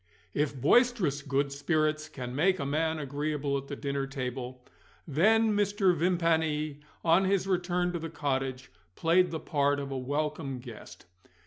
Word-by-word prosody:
If 145 -2 -1
boisterous 215 - +3
good 140 0 0
spirits 155 +1 0
can 125 -4 -6
make 185 +6 +3
a 140 - -3
man 160 +3 0
agreeable 145 0 -2
at 135 - -11
the 140 - -5
dinner 140 -1 -2
table, 130 -2 -5 0.4
then 220 +10 +4
indeed 210 -1 +2
Mr. 200 -3 +2
Vimpany, 160 -4 +1 0.3
on 170 +4 +5
his 195 -1 +1
return 180 -1 0
to 170 - -2
the 165 0 -5
cottage, 135 -4 -3 0.2
played 175 +2 +3
the 160 -1 -4
part 145 -3 +1
of 140 -1 -5
a 135 - -2
welcome 145 +1 -2
guest. 120 -3 -11
150 Hz, 155 wpm, -29 LUFS, 140-175 Hz, 0.4 s, on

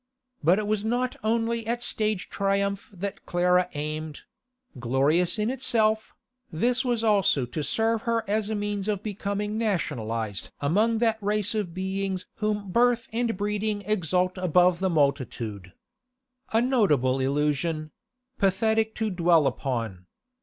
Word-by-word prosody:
But 170 +5 +5
it 215 - -1
was 210 0 0
not 245 +3 0
only 230 0 0
at 240 +1 -1
stage 215 -5 -1
triumph 200 0 -1
that 195 0 -6
Clara 180 0 +2
aimed; 155 +1 -4 0.6
glorious 140 - +2
in 215 +3 0
itself, 220 -4 +1 0.4
this 245 - +1
was 240 -3 0
also 200 - +3
to 120 +6 -4
serve 225 +8 0
her 230 -1 0
as 210 +1 0
a 220 - -1
means 205 -1 -2
of 205 -2 -1
becoming 210 0 -3
nationalised 115 - -2
among 210 +11 +2
that 220 -1 0
race 210 0 0
of 200 -6 -3
beings 190 0 -2
whom 210 -2 -2
birth 240 +2 +2
and 230 -2 0
breeding 205 0 -1
exalt 185 -2 0
above 180 0 +3
the 190 0 +1
multitude. 130 - -1 0.8
A 225 +1 +3
notable 150 - +2
illusion; 150 +3 0 0.5
pathetic 220 +3 +2
to 220 -1 -1
dwell 170 -3 +4
upon. 115 - -3
200 Hz, 135 wpm, -26 LUFS, 155-220 Hz, 0.8 s, But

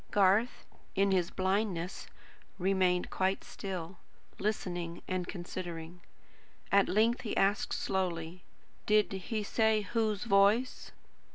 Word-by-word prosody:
Garth, 205 +4 +3 0.3
in 195 0 +3
his 180 -2 +2
blindness, 190 -2 -1 0.5
remained 185 -1 +1
quite 190 +1 0
still; 185 -2 -6 0.4
listening 175 -5 -3
and 185 -1 -2
considering. 175 -2 -6 0.7
At 200 0 +4
length 225 +4 +3
he 220 - -4
asked 200 +2 +2
slowly: 180 -2 -2 0.5
"Did 210 -1 +4
he 200 +3 -3
say 220 +1 +2
whose 215 0 -1
voice?" 210 +4 +3
195 Hz, 105 wpm, -32 LUFS, 180-210 Hz, 0.7 s, At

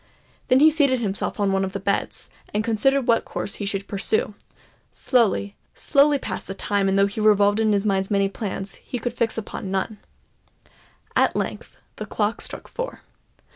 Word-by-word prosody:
Then 255 +2 +4
he 315 +1 +7
seated 280 -4 +3
himself 205 -1 -3
on 200 -1 +2
one 195 0 +1
of 190 0 -3
the 200 - -3
beds, 200 +1 -2 0.2
and 210 - +1
considered 245 +4 +2
what 230 -1 +3
course - - -4
he 200 - -2
should 195 0 -2
pursue. 435 - 0 0.6
Slowly—slowly 255 - +1
passed - - -5
the 195 - -5
time; 200 -1 0
and 195 - +2
though 195 - +5
he 200 +2 -3
revolved 205 0 +4
in 220 -1 +3
his 200 0 +1
mind 195 -2 +1
many 200 -2 +2
plans, 195 -1 -5
he 250 - -6
could 240 0 -3
fix 230 -2 -1
upon 205 -2 -5
none. 195 +2 -2 1.2
At - - +3
length - - -4 0.2
the - - -6
clock - - -1
struck - - -5
four. - - -6
210 Hz, 175 wpm, -23 LUFS, 195-245 Hz, 1.2 s, he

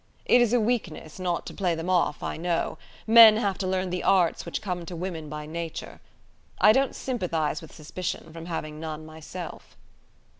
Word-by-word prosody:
It 245 - +5
is 240 -2 +3
a 245 - +4
weakness, 205 -9 -2
not 175 -2 -1
to - - -7
play 180 -4 0
them 165 +2 -5
off, 180 -5 +1
I - - -3
know. 170 0 -2 0.3
Men 225 -1 +9
have 200 -4 -1
to 190 - -1
learn 185 -1 -1
the 180 0 -2
arts 180 -4 +2
which - - -3
come 180 -3 -4
to 180 - -6
women 165 -3 -5
by 150 0 -6
nature. 165 +1 -6 0.6
I 210 +3 +7
don't 270 +4 +2
sympathize 165 - -2
with 160 - -12
suspicion, 160 +1 -6
from 165 0 -8
having 155 -3 -5
none 155 -1 -6
myself." 160 +2 -9
175 Hz, 185 wpm, -26 LUFS, 160-195 Hz, 0.6 s, Men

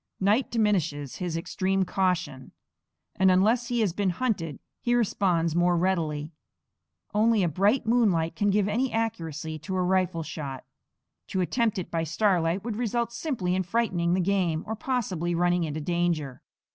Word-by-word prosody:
Night 210 +7 +2
diminishes 170 - 0
his 175 -3 -3
extreme 190 +3 0
caution, 180 -9 -1 0.6
and 190 0 +5
unless 220 +6 +3
he 240 -1 0
has 200 -6 +1
been 195 0 0
hunted 175 - -2 0.2
he 240 0 +1
responds 180 -8 +1
more 175 0 +3
readily. 160 -4 -1 0.8
Only 215 0 +3
a - - +2
bright 200 - +2
moonlight 205 -9 +2
can 205 - +1
give 205 0 +2
any 240 +5 0
accuracy 165 -9 -3
to 175 +5 -5
a 185 - +1
rifle 180 -2 +1
shot. 140 -5 -6 0.6
To 190 - -1
attempt 225 +3 0
it 185 - -5
by 165 -1 0
starlight 170 +1 +1
would 225 -2 -4
result 235 0 -1
simply 235 - -2
in 185 - +1
frightening 180 -3 0
the 185 - +1
game, 180 -4 0
or 220 - -3
possibly 200 -9 -2
running 175 0 +2
into 155 0 -4
danger. 170 -5 -1
185 Hz, 160 wpm, -27 LUFS, 165-215 Hz, 0.8 s, and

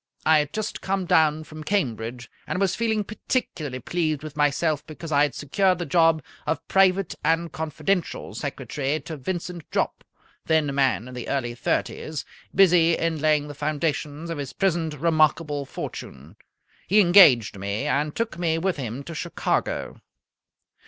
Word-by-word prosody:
I 155 -1 +6
had 150 -1 -2
just 215 +3 -4
come 195 -1 -1
down 155 -3 +3
from 155 0 -10
Cambridge, 125 - -2 0.2
and - - -2
was 195 -2 +2
feeling 220 -2 0
particularly 175 - -3
pleased 155 +1 -1
with 155 -1 -8
myself 150 +1 +1
because 160 +1 -8
I 145 -1 +4
had 145 -2 +2
secured 185 +5 +1
the 175 - -3
job 165 0 +3 0.2
of 160 - -2
private 195 -1 +3
and 165 0 +1
confidential 160 +4 -2
secretary 145 +2 -3
to 160 +3 -7
Vincent 175 +3 -5
Jopp, - - -1 0.4
then 160 -2 +3
a - - -3
man 130 -6 +1
in 125 - -9
the 125 -2 -6
early 120 -4 -1
thirties, 150 +4 -2 0.3
busy 170 -3 +5
in 165 -2 -1
laying 150 -1 +2
the 145 - -7
foundations 150 +1 -2
of 165 - -4
his 140 -2 -5
present 170 -5 0
remarkable 155 -1 +2
fortune. - - -8 0.5
He 205 +3 +5
engaged 155 - +6
me, 100 +7 -2
and 150 0 0
took 225 -6 -2
me 165 -2 +1
with 180 +1 -1
him 130 0 -5
to 165 - -8
Chicago. 170 +2 -2
155 Hz, 160 wpm, -24 LUFS, 145-175 Hz, 0.5 s, I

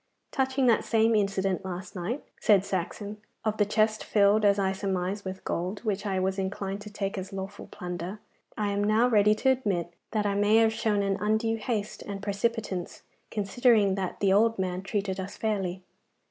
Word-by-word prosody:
'Touching 265 0 +1
that 235 -3 +4
same 225 0 +3
incident 195 -3 +1
last 185 0 -6
night,' 195 +10 -3 0.2
said 200 -3 +4
Saxon, 200 +3 -3 0.3
'of 215 0 0
the 210 - +3
chest 215 +1 +2
filled, 205 +1 +4
as 200 -1 +5
I 190 -1 +1
surmise, 190 0 -2
with 190 0 -6
gold, 180 +4 -3
which 210 -2 -1
I 190 -1 0
was 190 +1 0
inclined 195 +1 -3
to 210 - -8
take 200 -1 -3
as 185 0 -7
lawful 195 +1 -6
plunder, 180 +2 -5 0.4
I 210 -1 0
am 200 0 0
now 215 +3 +4
ready 210 -3 +4
to 265 +5 +2
admit 195 -10 -1 0.2
that 215 -2 -1
I 200 - +1
may 205 +2 +3
have 225 0 +5
shown 210 -2 +1
an 195 -1 0
undue 220 +2 +1
haste 215 -2 -3
and 200 -1 -6
precipitance, 205 -2 -2 0.3
considering 210 -1 +3
that 190 -2 -3
the 195 -1 +4
old 225 +3 +4
man 185 -1 -2
treated 195 -1 -2
us 190 +2 -6
fairly. 190 -4 -2
200 Hz, 185 wpm, -28 LUFS, 190-215 Hz, 0.4 s, as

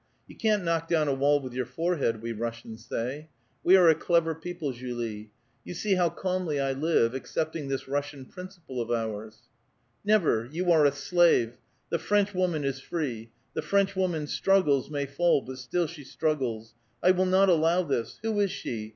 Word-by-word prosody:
' - - -43
You - - -13
can't 215 -3 +1
knock 165 -1 0
down 160 -3 +2
a 140 - +2
wall 145 +2 +3
with 130 -3 -8
your 125 -1 -2
forehead,' 135 -6 -1
we 115 - -3
Russians 115 0 -6
say. 140 +7 -4 0.3
We 185 +2 +7
are 180 -2 +6
a 160 - +8
clever 165 0 +1
people, 160 -2 -5
Julie. 120 -4 -5 0.3
You 175 - -7
see 205 +3 0
how 180 -2 +3
calmly 180 -3 -2
I 135 0 0
live, 135 -4 +2
accepting 155 +3 -3
this 135 -1 -3
Russian 140 -1 -3
•principle 175 -7 -8
of 115 - -5
ours." 110 -2 -3 0.3
" 120 -1 -43
Never! 125 - +2
You 175 +3 0
are 155 -3 +5
a - - +2
slave! 145 -5 +2 0.3
The 170 - +1
French 205 +4 +1
woman 180 -5 0
is 135 -1 -2
free. 125 -8 -4 0.2
The - - -2
French 200 0 +1
woman 175 -5 0
struggles, 150 -5 +2
may 145 -2 -2
fall, 140 +1 +2
but 130 0 -8
still 150 +8 -1
she 155 -2 -9
struggles. 130 -6 -2 0.3
I 185 - +7
will 185 0 +2
not 190 +1 +4
allow 170 +1 +3
this. 135 -7 -2
Who 220 -2 0
is 200 -1 +2
she? 110 -9 -5
150 Hz, 190 wpm, -27 LUFS, 125-175 Hz, 0.3 s, a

